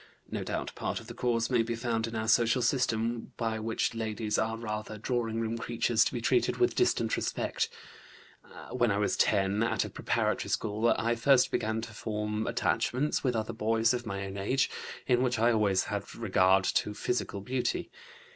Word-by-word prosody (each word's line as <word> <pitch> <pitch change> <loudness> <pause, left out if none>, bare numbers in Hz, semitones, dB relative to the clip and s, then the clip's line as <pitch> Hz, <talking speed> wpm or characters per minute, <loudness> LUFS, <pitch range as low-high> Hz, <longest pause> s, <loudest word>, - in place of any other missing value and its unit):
(No - - -2
doubt, - - -3
part - - -3
of - - -12
the - - -8
cause 120 -1 0
may 120 -2 +4
be 115 +1 -2
found 115 -1 -1
in 115 - -6
our 110 0 -2
social 120 +2 +3
system, 115 -2 0
by 115 -2 -1
which 110 +1 -1
ladies 110 -1 -2
are 110 0 0
rather 110 -1 -5
drawing 115 0 -1
room 115 0 -2
creatures 115 -1 +2
to - - -2
be - - -2
treated - - +2
with - - +3
distant - - +2
respect.) - - -1 1.0
When 120 -2 +2
I 100 - +1
was 105 0 +1
10, 100 +1 +2
at 115 - +1
a - - -7
preparatory - - -1
school, 110 +2 0
I 115 +1 +1
first 130 +2 +4
began 110 +1 -1
to 115 0 -8
form 105 0 -3
attachments 140 +5 0
with 125 -3 +1
other 110 -1 -2
boys 115 +2 +2
of 120 -2 -3
my 100 -1 -3
own 95 0 -6
age, 130 +7 +1 0.3
in 125 -1 +3
which 125 -2 +1
I 115 +2 +4
always 105 -4 +2
had 100 -1 -5
regard 95 -3 +3
to 105 +2 0
physical 115 -4 -2
beauty. 125 +4 -2
115 Hz, 185 wpm, -30 LUFS, 105-120 Hz, 1.0 s, may